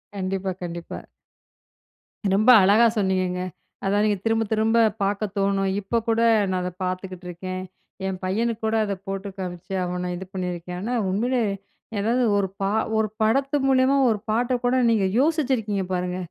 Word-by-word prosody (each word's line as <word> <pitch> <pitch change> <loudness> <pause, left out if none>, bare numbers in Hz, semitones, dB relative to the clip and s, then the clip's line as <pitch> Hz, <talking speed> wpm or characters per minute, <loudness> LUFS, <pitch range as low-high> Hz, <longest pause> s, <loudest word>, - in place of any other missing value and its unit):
கண்டிப்பா, 190 0 -2
கண்டிப்பா. 170 -1 -6 1.3
ரொம்ப 215 +5 +3
அழகா 205 +5 +6
சொன்னீங்கங்க. 185 -2 0 0.5
அதான் 205 +2 +2
நீங்க 210 -1 +1
திரும்ப, 225 0 +2
திரும்ப 220 +1 +2 0.3
பாக்க 200 +2 0
தோணும். 195 0 +1
இப்ப 205 +4 -1
கூட 225 0 +2 0.3
நான் 185 - 0
அத 180 - -2
பாத்துக்கிட்ருக்கேன். 185 0 -5 0.4
என் 190 -1 -3
பையனுக் 225 +4 -1
கூட 220 0 +1
அத 205 -2 -1
போட்டு 195 +1 -4
காமிச்சு 185 0 -6
அவன 180 0 -3
இது 185 +2 -6
பண்ணியிருக்கேன்னு, 180 -1 -4
ஆனா 240 +4 -2 0.2
உண்மையிலே 240 +6 +1 0.6
ஏதாவது 235 +5 +1
ஒரு 195 - +1
பா 195 - +1 0.3
ஒரு 220 0 +2
படத்து 270 +6 +2
மூலியமா 265 +1 +4
ஒரு 215 -2 0
பாட்ட 240 +4 +1
கூட 245 +1 +2
நீங்க 220 -4 +2
யோசிச்சிருக்கீங்க 260 - +1
பாருங்க, 180 0 -2
200 Hz, 145 wpm, -24 LUFS, 185-225 Hz, 1.3 s, அழகா